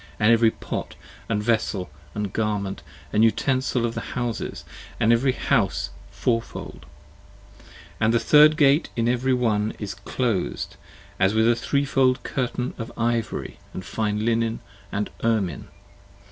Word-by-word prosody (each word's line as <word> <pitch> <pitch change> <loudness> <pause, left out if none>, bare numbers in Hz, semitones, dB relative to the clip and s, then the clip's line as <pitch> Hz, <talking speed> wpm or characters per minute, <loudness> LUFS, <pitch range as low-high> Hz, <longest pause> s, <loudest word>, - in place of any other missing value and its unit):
And 110 +2 +5
every 115 -1 +5
pot - - -5 0.3
& - - -25
vessel 105 -4 0 0.2
& 105 -2 -3
garment 105 -3 -1 0.2
& - - -23
utensil 125 +3 +2
of 115 - -2
the - - -4 0.2
houses, 120 -2 -3 0.3
And 115 +1 +4
every 130 +3 +2
house, - - 0 0.2
fourfold; 115 -1 -3 1.1
but 110 0 +3
the 115 - +4
third 150 +3 +6
Gate 145 +1 +4
in 115 0 +1
every 125 +2 +2
one 110 -3 0
Is 105 -2 -5
clos'd 105 0 -2 0.4
as 95 +3 +3
with 110 +1 +4
a 120 - +5
threefold 135 0 +1
curtain 125 -1 -2
of 115 - -5
ivory 115 -1 -1 0.2
& - - -3
fine 105 +2 -2
linen 115 -1 +1 0.3
& 100 +1 -4
ermine. 110 -8 0
115 Hz, 135 wpm, -24 LUFS, 105-125 Hz, 1.1 s, third